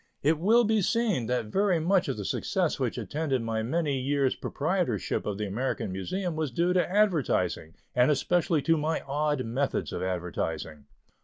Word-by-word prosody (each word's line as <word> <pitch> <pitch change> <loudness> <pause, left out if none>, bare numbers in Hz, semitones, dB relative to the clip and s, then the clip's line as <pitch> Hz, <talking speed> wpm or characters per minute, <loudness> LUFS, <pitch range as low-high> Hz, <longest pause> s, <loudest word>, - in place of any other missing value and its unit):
It 155 +2 +3
will 225 +7 +5
be 220 -1 +2
seen 205 - +1
that 125 -2 0
very 185 - +1
much 180 +3 +2
of 135 - -2
the 100 - -5
success - - -1
which - - -1
attended 145 -5 -2
my 115 -1 -1
many 140 +3 0
years 135 0 +1
proprietorship 155 - -1
of 100 -2 -2
the 105 - -2
American 105 0 -2
Museum 170 - -3
was 155 -2 -1
due 170 +8 +1
to 180 -1 +2
advertising, 150 - +1 0.2
and 125 +2 +4
especially 160 +1 +1
to 165 0 +3
my 155 +2 -1
odd 145 -1 -1
methods 130 +5 -1
of - - -3
advertising. 80 -4 -3
145 Hz, 170 wpm, -28 LUFS, 115-175 Hz, 0.2 s, will